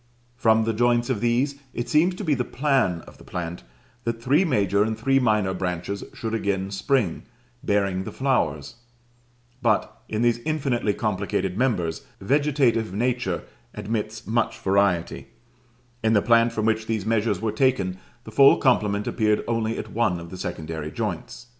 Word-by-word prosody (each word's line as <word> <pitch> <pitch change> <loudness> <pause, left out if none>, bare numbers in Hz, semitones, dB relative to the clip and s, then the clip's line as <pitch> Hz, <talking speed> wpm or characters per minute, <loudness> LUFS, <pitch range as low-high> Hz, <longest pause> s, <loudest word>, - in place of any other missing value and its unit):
From 110 -2 +3
the 115 0 0
joints 120 +2 +2
of 110 -5 -2
these, 130 +4 +1 0.2
it 120 - -3
seems 170 +4 +3
to 205 - -6
be 155 -5 +2
the 125 -2 0
plan 130 - +1
of - - -16
the - - -14
plant 85 0 -5 0.4
that 115 -1 -2
three 140 +9 +3
major 100 - +2
and 110 +1 0
three 135 0 +2
minor 105 -6 +2
branches 90 +2 -3
should 115 -1 -5
again 100 -3 -1
spring, 100 -1 0 0.4
bearing 100 -2 +1
the - - -6
flowers: 85 - -1 0.8
but, 110 -4 0
in 110 +2 -1
these 120 -1 +2
infinitely 130 -7 -1
complicated 100 -3 -1
members, 95 -9 0 0.2
vegetative 130 -3 +1
nature 120 -3 -1 0.3
admits 110 +1 -4
much 115 0 0
variety; 95 -3 +1 0.8
in 110 0 +3
the 105 - +4
plant 115 0 +4
from 110 -2 -2
which 110 0 0
these 110 -4 -2
measures 110 -3 +1
were 110 +1 -1
taken 105 -6 +1 0.2
the 110 - -10
full 135 +5 +7
complement 105 -5 +2
appeared 105 -1 +1
only 115 -1 -1
at - - -6
one 105 -6 +1
of 85 0 -10
the 95 - -7
secondary 80 -3 -5
joints. 120 - -5
110 Hz, 160 wpm, -24 LUFS, 100-120 Hz, 0.8 s, full